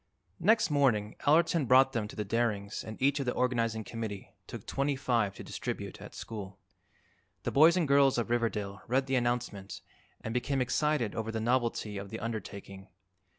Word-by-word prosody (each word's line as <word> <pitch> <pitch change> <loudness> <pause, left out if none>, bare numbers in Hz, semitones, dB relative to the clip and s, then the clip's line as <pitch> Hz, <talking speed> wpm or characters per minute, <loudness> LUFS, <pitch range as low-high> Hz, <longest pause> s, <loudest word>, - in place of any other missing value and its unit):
Next 220 -5 +3
morning 120 -8 +2
Allerton 165 -1 +4
brought 130 +2 +6
them 110 -3 -1
to - - -11
the 105 - -3
Darings 105 -2 -1
and 110 0 -8
each 140 +2 +2
of 135 - -3
the 125 - +1
Organizing 115 -3 0
Committee 105 -2 -6
took - - -8
twenty 140 +1 0
five 115 -7 0
to - - -8
distribute - - -5
at - - -10
school. 100 -3 -7 0.9
The - - -1
boys 160 +5 +6
and 170 -4 +1
girls 140 -1 +4
of 120 0 -1
Riverdale 105 -4 -1
read 130 +3 +1
the 135 - -3
announcement 120 -5 -2 0.4
and 110 - -5
became 135 +3 0
excited 130 -2 +1
over 115 0 -3
the 110 - -2
novelty 115 -3 0
of 100 0 -8
the 110 - -6
undertaking. 100 -4 -6
120 Hz, 175 wpm, -30 LUFS, 105-135 Hz, 0.9 s, brought